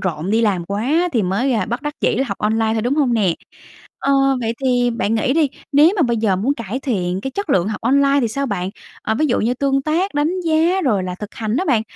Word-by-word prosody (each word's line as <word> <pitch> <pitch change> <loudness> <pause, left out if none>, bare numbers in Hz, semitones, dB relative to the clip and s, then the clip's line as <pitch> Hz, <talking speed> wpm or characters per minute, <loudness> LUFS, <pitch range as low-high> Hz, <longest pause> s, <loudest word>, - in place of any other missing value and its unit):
rộn 175 0 -3
đi 225 +1 +2
làm 195 -6 +1
quá 265 - 0
thì 225 -4 +1
mới 205 +9 0 0.2
bất 240 +4 -3
đắc 295 0 -4
dĩ - - +1
học 200 - -5
online 220 +1 +1
thôi, 220 -1 -1
đúng 250 +4 0
hông 270 -6 +2
nè? 190 -7 +2 0.6
Ờ, 275 0 0 0.3
vậy 225 -1 -1
thì 245 -1 +2
bạn 225 -1 -1
nghĩ 230 +4 +1
đi, 305 -2 +2 0.2
nếu 290 +3 +6
như 355 - +4
mà 340 - +3
bây 235 -3 +1
giờ 210 -4 +1
muốn 255 +9 0
cải 235 +1 -5
thiện 190 -8 -2
cái 270 - -4
chất 400 +1 -4
lượng 190 -4 +2
học 210 - -4
online 275 +3 +3
thì 235 - 0
sao 275 +5 -2
bạn? 190 -4 -3 0.3
Ờ, 220 - -1
ví 310 +6 +1
dụ 245 - +1
như 240 +3 0
tương 275 0 0
tác, 325 +4 -1
đánh 320 +6 0
giá 335 +3 +2
rồi 210 -7 +1
là 180 -1 -4
thực 210 +2 -9
hành 220 +1 -2
đó 370 - 0
bạn, 235 - +2
240 Hz, 255 wpm, -19 LUFS, 210-280 Hz, 0.6 s, nếu